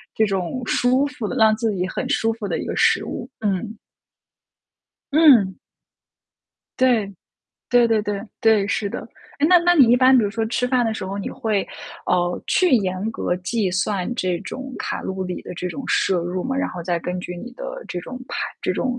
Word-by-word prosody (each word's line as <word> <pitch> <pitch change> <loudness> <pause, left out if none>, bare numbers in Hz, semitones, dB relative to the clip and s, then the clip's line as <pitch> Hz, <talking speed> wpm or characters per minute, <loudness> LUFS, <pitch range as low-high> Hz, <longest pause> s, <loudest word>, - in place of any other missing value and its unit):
这 220 - +3
种 195 +4 -2
舒 255 +4 +2
服 280 -7 -5
的 - - -4
让 220 -1 +5
自 225 0 -1
己 185 0 -1
很 - - -4
舒 225 - +1
服 220 -2 -6
的 - - -1
一 - - -4
个 - - -3
食 - - +3
物， - - -6
嗯。 210 +1 -1 1.4
嗯。 250 - +6 1.2
对。 235 -6 +3 0.6
对 245 -1 +5
对 225 -2 +2
对。 205 -1 -3 0.2
对。 220 -3 +4
是 200 0 -1
的。 - - -5 0.4
诶， 295 - +4
那 360 +2 +7
那 350 +1 +3
你 265 -7 +6
一 - - +6
般 260 +1 +6
比 230 - +4
如 200 - -1
说 225 +1 -1
吃 245 +2 0
饭 250 -1 +2
的 225 - 0
时 215 - -5
候， 195 - -4
你 200 - -4
会， 220 -6 -1 0.4
呃， 175 0 0
去 365 -3 +3
严 190 0 -1
格 175 - -1
计 190 +1 -1
算 185 +3 -1
这 185 -6 -1
种 265 0 -7
卡 - - -3
路 190 0 -4
里 180 -1 -4
的 - - -8
这 180 +1 -4
种 275 +8 -6
摄 190 - +2
入 180 +2 -3
吗？ 265 +1 -2
然 275 - 0
后 175 - -7
再 175 0 -1
根 180 +2 -4
据 180 0 -6
你 245 +8 -8
的 - - -7
这 180 - -4
种 255 +8 -8
排 - - -5 0.2
这 - - 0
种 250 -1 -2
220 Hz, 220 characters per minute, -22 LUFS, 185-255 Hz, 1.4 s, 那